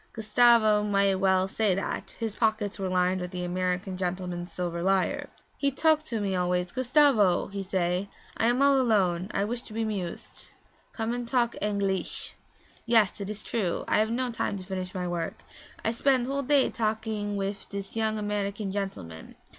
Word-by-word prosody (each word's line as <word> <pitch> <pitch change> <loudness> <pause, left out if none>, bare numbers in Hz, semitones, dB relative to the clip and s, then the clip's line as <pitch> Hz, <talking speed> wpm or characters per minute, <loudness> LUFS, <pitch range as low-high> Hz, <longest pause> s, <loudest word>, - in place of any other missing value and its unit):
(Gustavo 220 -1 +4
might 200 -1 +2
well 190 -1 +3
say 200 -1 +1
that; 195 - -4
his 225 -3 -2
pockets 215 -2 0
were 190 -1 -1
lined 185 0 +1
with 180 - -4
the 180 -1 -4
American 180 +1 -2
gentleman's 180 -1 -3
silver 170 -1 -3
lire.) 190 +1 +1 0.3
'He 280 - +2
talk 310 +3 +3
to 230 -6 -3
me 195 -2 -1
always. 180 0 0
"Gustavo," 255 - +3
he 200 0 -4
say, 185 0 -1 0.3
"I 225 - +1
am 245 +3 +3
all 280 -1 +5
alone; 190 -6 +2
I 200 - 0
wish 240 +3 -3
to 215 - -12
be 225 0 -1
'mused. 195 -5 -6 0.4
Come 225 0 -2
and 245 -1 -4
talk 240 -1 +1
Angleesh." 200 -2 -1 0.5
Yes, 220 -4 +3
it 200 - -4
is 215 0 -6
true; 200 -7 -1
I - - +3
have 215 +1 +2
no 245 +2 -1
time 215 -3 -2
to 185 - -7
finish 185 0 -5
my 180 -1 -2
work; 170 -2 -4 0.4
I 225 - +2
spend 255 +1 +2
whole 275 +2 -1
day 280 0 +3
talking 215 -2 -2
wif 195 0 -4
dis 200 +1 -6
yong 220 -1 0
American 205 -1 -2
gentleman. 95 - -5
205 Hz, 180 wpm, -28 LUFS, 185-225 Hz, 0.5 s, all